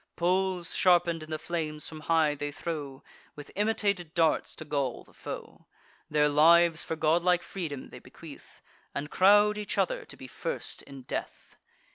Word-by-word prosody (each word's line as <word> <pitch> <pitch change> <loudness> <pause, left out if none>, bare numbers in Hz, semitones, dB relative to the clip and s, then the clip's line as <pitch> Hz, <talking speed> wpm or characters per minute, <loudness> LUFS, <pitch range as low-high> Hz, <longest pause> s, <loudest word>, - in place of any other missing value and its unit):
Poles, 180 0 0
sharpen'd 175 -3 +3
in 155 - -10
the 155 - -2
flames, 155 -2 -4
from 155 - -8
high 155 -1 +2
they 145 0 -4
throw, 145 -3 -6 0.3
With 145 -1 -11
imitated 200 -5 0
darts, 165 -2 +1
to 155 - -8
gall 140 -4 -2
the - - -23
foe. - - -9 0.4
Their 150 -1 +3
lives 165 +3 +5
for 160 - -3
godlike 170 +3 +2
freedom 155 -8 -6
they - - -10
bequeath, - - -14 0.3
And 145 +2 -4
crowd 205 +2 +5
each 210 - -4
other - - 0
to - - -12
be - - -10
first 485 - -4
in 135 -2 -12
death. - - -6
165 Hz, 160 wpm, -29 LUFS, 150-180 Hz, 0.4 s, lives